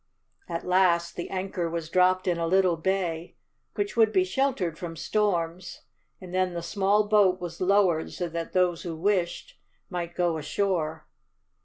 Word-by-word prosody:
At 170 -1 -4
last 180 -2 +2
the 175 - -5
anchor 185 -2 -3
was 165 -1 -4
dropped 185 +2 +2
in 175 -2 +1
a 165 - 0
little 185 0 +3
bay, 170 -1 -2 0.4
which 405 -1 -2
would 225 -2 +4
be 190 -3 +3
sheltered 185 - -1
from 170 -1 -7
storms, 175 -1 -1 0.4
and 180 -2 -10
then 185 -1 0
the 170 - -4
small 205 +2 +1
boat 200 -3 +4
was 175 -1 -7
lowered 185 -4 +2
so 175 - -3
that 165 0 -5
those 180 -2 +2
who 170 -2 -5
wished 180 0 -1 0.3
might 175 -1 -4
go 170 -3 0
ashore. 160 0 -1
180 Hz, 160 wpm, -27 LUFS, 170-190 Hz, 0.4 s, would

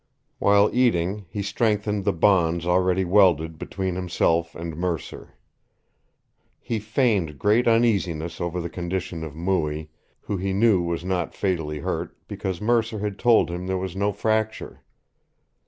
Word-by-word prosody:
While 100 +1 +4
eating 105 -5 +1
he 100 +4 -4
strengthened 105 -1 0
the - - +3
bonds 85 -2 +2
already 90 +1 +2
welded 85 -4 +3
between 95 -2 -3
himself 85 -2 0
and 85 -1 -6
Mercer. 85 -1 -4 1.2
He 115 - -3
feigned 105 - 0
great 110 - +2
uneasiness 95 -9 +1
over 85 +1 -2
the 85 - -3
condition 85 -1 -4
of 75 -2 -7
Mooie, 80 -3 -1 0.3
who 100 - -3
he 95 +1 -2
knew 100 -2 +4
was 85 0 -3
not 90 -3 -2
fatally 80 -6 -1
hurt - - -4
because 95 -3 -4
Mercer 115 0 +1
had 105 -1 -4
told 120 -7 +4
him 90 +1 -5
there 95 0 0
was 95 -1 -4
no 100 +1 +1
fracture. 110 +1 -2
95 Hz, 140 wpm, -24 LUFS, 85-105 Hz, 1.2 s, While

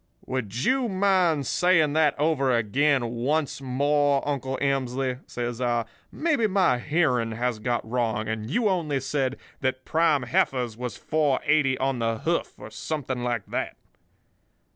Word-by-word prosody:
"'Would 125 -2 -3
you 260 -2 +2
mind 185 -6 +2
saying 160 0 +3
that 155 -2 +2
over 145 -3 +2
again 130 +4 +2
once 135 +6 -1
more, 140 +2 +1
Uncle 135 -2 -2
Emsley?' 130 -2 -1
says 120 0 -4
I. 120 -2 +1 0.3
'Maybe 300 -9 +1
my 185 -11 +2
hearing 125 -6 +1
has 120 0 -2
got 120 0 -2
wrong, 110 -2 -1
and 110 0 -3
you 225 - +1
only 165 -8 0
said 135 0 -1 0.2
that 130 -1 -2
prime 155 -4 +2
heifers 125 -1 0
was 125 +1 -5
4.80 145 -2 +1
on 135 -1 0
the 115 -1 0
hoof, 170 +9 -2
or 110 - -10
something 130 +2 -4
like 120 -4 -1
that. - - -4
135 Hz, 140 wpm, -25 LUFS, 120-155 Hz, 0.3 s, saying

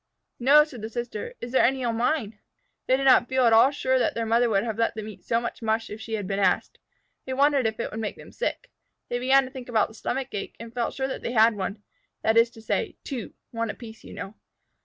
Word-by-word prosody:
"No," 285 +5 +7
said 270 -7 -10
the 220 - -5
sister. 240 - -5
"Is 240 - -6
there 260 - +4
any 260 +1 +2
on 235 -2 0
mine?" 225 -3 -1 0.5
They 260 - +4
did 270 - -2
not 260 -2 +5
feel 260 -1 +3
at 230 - +5
all 230 +4 +7
sure 260 -2 +1
that - - +1
their 230 - -1
mother 230 +2 +3
would 200 -2 +2
have 225 -2 -4
let 230 - +1
them 215 -1 -5
eat 200 -4 -10
so 230 - +1
much 235 +1 -5
mush 225 0 -1
if 215 +1 -7
she 225 - -7
had 205 -2 -3
been 195 +1 -2
asked. 185 -2 +1 0.5
They 260 - -3
wondered 275 -2 +3
if 220 +1 -4
it - - -3
would 220 - -5
make 215 -2 -3
them - - -13
sick. - - -4 0.4
They 245 - -1
began 265 +2 +5
to 260 - -10
think 255 -2 -9
about 225 -3 +2
the - - -14
stomach 260 +4 -3
ache, 200 - -5
and 230 +1 -9
felt 240 -1 -2
sure 265 -1 -1
that 265 - -5
they 235 - -3
had 225 -1 +5
one 200 +1 -4 0.4
that 220 - +3
is 230 +1 +5
to 225 -2 -15
say, - - -1
two 255 -7 -6 0.2
one 230 -1 -2
apiece, 220 0 -9
you - - -11
know. 195 - -6
235 Hz, 260 wpm, -26 LUFS, 220-260 Hz, 0.5 s, No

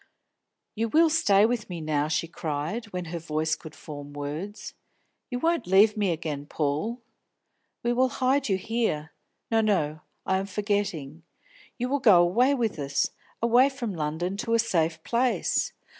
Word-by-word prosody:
"You 225 +1 -1
will 320 +6 +4
stay 205 -10 +4
with 230 -2 -1
me 175 -2 -5
now?" 150 -2 0
she 165 +1 0
cried, 160 +7 -3
when 180 -4 -5
her 170 - -2
voice 155 0 -1
could 155 -1 -12
form 145 -1 -9
words. 150 +9 -6 0.6
"You 245 - -2
won't 330 - 0
leave 205 +4 +5
me 205 -3 +1
again, 150 -3 -3
Paul? 160 - -2 0.8
We 240 0 +1
will 255 +1 +3
hide 265 +1 +1
you 190 - +2
here. 190 -8 -2 0.4
No, 225 0 +4
no; 155 -8 +1 0.3
I 190 - +2
am 195 +1 -3
forgetting. 195 -7 -2 0.6
You 250 - -1
will 285 +2 0
go 210 -9 +7
away 245 +11 +3
with 230 - -1
us, 140 0 0 0.3
away 245 +4 +5
from 245 -6 -4
London 165 +4 -2
to 230 +2 0
a - - +5
safe 165 -7 0
place. 245 +1 +1
195 Hz, 160 wpm, -27 LUFS, 155-235 Hz, 0.8 s, go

